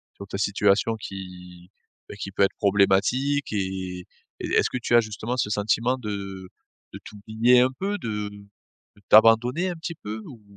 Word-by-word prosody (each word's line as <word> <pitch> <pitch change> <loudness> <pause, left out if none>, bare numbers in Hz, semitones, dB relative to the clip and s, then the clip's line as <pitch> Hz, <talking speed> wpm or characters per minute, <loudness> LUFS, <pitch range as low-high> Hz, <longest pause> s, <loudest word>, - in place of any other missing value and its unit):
sur 100 - -10
ta 95 - -5
situation 100 +2 +2
qui, 90 -3 -10 0.4
bah, - - -8
qui 100 -1 -6
peut 100 - +1
être 95 - +1
problématique. 105 +8 +2
Et 95 -2 -4 0.4
et - - -3
est-ce - - +2
que - - -2
tu 120 - -2
as - - +8
justement 110 +3 -5
ce 105 - 0
sentiment 115 +5 +1
de 100 -5 -6 0.5
de - - -8
t'oublier 110 +4 +2
un 130 +1 +2
peu? 200 +2 -2
De 105 -2 -4 0.7
de - - -21
t'abandonner 120 +10 +5
un 175 - -4
petit 165 +1 -6
peu, 110 -5 -7
ou? 120 -5 -12
105 Hz, 170 wpm, -24 LUFS, 100-120 Hz, 0.7 s, as